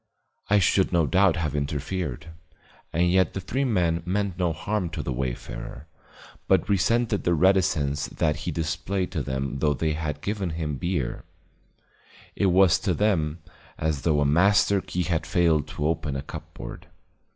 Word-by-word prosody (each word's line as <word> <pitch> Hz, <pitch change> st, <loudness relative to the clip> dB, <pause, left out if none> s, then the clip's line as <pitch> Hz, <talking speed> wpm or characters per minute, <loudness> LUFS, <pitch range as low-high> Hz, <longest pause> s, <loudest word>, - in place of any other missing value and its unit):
I 105 Hz, -, +5 dB
should 95 Hz, 0 st, +3 dB
no 85 Hz, -3 st, +3 dB
doubt 95 Hz, +1 st, +3 dB
have 80 Hz, -4 st, -2 dB
interfered; 75 Hz, +1 st, -3 dB, 0.6 s
and 85 Hz, +2 st, +2 dB
yet 95 Hz, 0 st, +2 dB
the -, -, -1 dB
three 125 Hz, +9 st, -2 dB
men 85 Hz, -8 st, +1 dB
meant 95 Hz, 0 st, -2 dB
no 90 Hz, -2 st, +2 dB
harm 95 Hz, +3 st, -2 dB
to 80 Hz, -, -5 dB
the 65 Hz, -, -2 dB
wayfarer, -, -, -5 dB, 0.6 s
but -, -, +3 dB
resented 105 Hz, +3 st, +1 dB
the 85 Hz, -, +2 dB
reticence 80 Hz, -5 st, +2 dB
that 75 Hz, -2 st, 0 dB
he 75 Hz, +3 st, -4 dB
displayed 85 Hz, +4 st, -2 dB
to 85 Hz, -5 st, -2 dB
them 65 Hz, +1 st, -3 dB
though 75 Hz, +1 st, +2 dB
they 80 Hz, +3 st, 0 dB
had 75 Hz, -2 st, -4 dB
given 100 Hz, -1 st, -2 dB
him 75 Hz, -4 st, -2 dB
beer; 80 Hz, -6 st, -2 dB, 1.1 s
it 100 Hz, -, +2 dB
was 90 Hz, -1 st, +5 dB
to 95 Hz, -2 st, 0 dB
them 85 Hz, -6 st, 0 dB, 0.3 s
as 75 Hz, -3 st, -1 dB
though 75 Hz, -2 st, +2 dB
a -, -, +2 dB
master 100 Hz, +6 st, +4 dB
key 90 Hz, 0 st, -2 dB
had 85 Hz, -2 st, -1 dB
failed 80 Hz, -5 st, +2 dB
to 75 Hz, -, -4 dB
open 80 Hz, -3 st, -1 dB
a 70 Hz, -, -3 dB
cupboard. 80 Hz, -5 st, -9 dB
85 Hz, 160 wpm, -25 LUFS, 75-95 Hz, 1.1 s, I